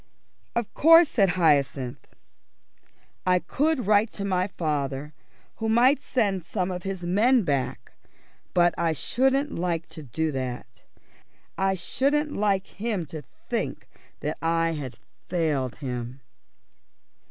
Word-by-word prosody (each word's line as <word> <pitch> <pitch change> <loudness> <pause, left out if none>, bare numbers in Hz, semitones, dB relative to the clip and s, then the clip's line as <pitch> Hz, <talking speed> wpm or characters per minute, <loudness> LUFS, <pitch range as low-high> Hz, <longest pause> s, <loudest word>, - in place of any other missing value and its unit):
"Of 235 -3 -2
course," 330 +1 +7
said 200 -5 +3
Hyacinth, 140 -6 +1 1.2
"I 180 0 +3
could 275 - 0
write 210 +2 +4
to 200 - -4
my 185 -1 +1
father, 150 -5 -3 0.4
who 225 0 -2
might 255 +5 +4
send 200 -8 0
some 180 +2 -2
of 180 0 -4
his 190 -1 -5
men 220 +7 +3
back, 140 -5 -2 0.6
but 175 -1 +4
I 165 -1 +2
shouldn't 270 - +1
like 170 -1 -2
to 160 - -9
do 155 +4 -2
that. 130 -3 -5 0.7
I 195 0 +1
shouldn't 285 - 0
like 200 -2 +1
him 205 -4 -3
to 155 - -5 0.3
think - - -3 0.3
that 150 - -3
I 165 0 +1
had 140 -6 -5 0.3
failed 150 -8 0
him." 125 -1 -5
180 Hz, 125 wpm, -26 LUFS, 150-220 Hz, 1.2 s, course